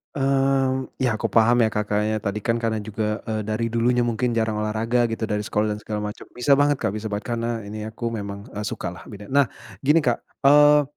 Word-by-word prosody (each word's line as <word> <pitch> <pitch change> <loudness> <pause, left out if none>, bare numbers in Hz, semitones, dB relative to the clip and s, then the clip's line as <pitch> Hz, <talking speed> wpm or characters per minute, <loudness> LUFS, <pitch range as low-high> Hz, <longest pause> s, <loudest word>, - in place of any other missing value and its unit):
Mmm, 135 -1 +1 0.2
ya - - +3
aku - - 0
paham 115 +1 +6
ya, 110 - +4
Kak. 105 - 0
Kakaknya 105 +1 +1
tadi 100 0 -2
kan 115 - +3
karena 110 -1 0
juga, 105 +1 -3
eee, 110 -1 -1
dari 110 +2 -1
dulunya 120 +1 +2
mungkin 120 +1 0
jarang 110 -1 +1
olahraga 110 +3 +1
gitu 115 - -3
dari 105 -1 -1
sekolah 105 +1 0
dan - - -8
segala 105 -1 -3
macam. 105 - -10
Bisa 125 +3 +2
banget, 145 0 +3
Kak, - - 0
bisa 110 +1 -4
banget 105 +1 -3
karena 115 0 -1 0.2
ini 105 +1 -6
aku 110 +2 -11
memang, 100 +1 -6
eee, 105 - -3
sukalah, - - -5
beda. 100 0 -10
Nah, 140 +3 +4 0.4
gini, 150 +4 +5
Kak, 125 -6 +1 0.3
eee, 145 +1 +7
115 Hz, 215 wpm, -23 LUFS, 105-130 Hz, 0.4 s, eee